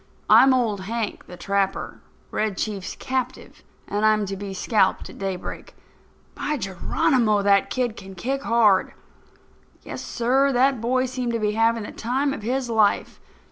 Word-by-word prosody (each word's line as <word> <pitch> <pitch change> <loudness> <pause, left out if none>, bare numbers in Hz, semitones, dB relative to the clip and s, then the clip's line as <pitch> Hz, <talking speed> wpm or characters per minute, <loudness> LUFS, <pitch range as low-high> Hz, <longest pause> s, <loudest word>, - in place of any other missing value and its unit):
I'm 270 - +8
Old 230 -6 +1
Hank, 225 0 -4
the 180 - -10
Trapper, 195 +1 -2 0.3
Red 215 -3 -1
Chief's 200 -4 -4
captive, 260 -1 -4 0.3
and 205 +1 -2
I'm 215 -1 +3
to 195 0 -4
be 200 0 -6
scalped 190 0 +1
at - - -14
daybreak. 190 -2 -5 0.6
By 300 0 -2
Geronimo! 210 - +1
that 200 0 +3
kid 245 -4 -1
can 195 0 -11
kick 265 +9 -2
hard." 225 -7 +3 0.9
Yes, - - -7
sir, 265 +4 +1
that 260 -1 +2
boy 255 +2 +1
seemed 250 -2 -3
to 230 - 0
be 210 -1 0
having 225 +1 +1
the - - -7
time 270 +4 -1
of 280 - -6
his 250 +4 -1
life. 220 -3 +1
225 Hz, 155 wpm, -23 LUFS, 200-255 Hz, 0.9 s, I'm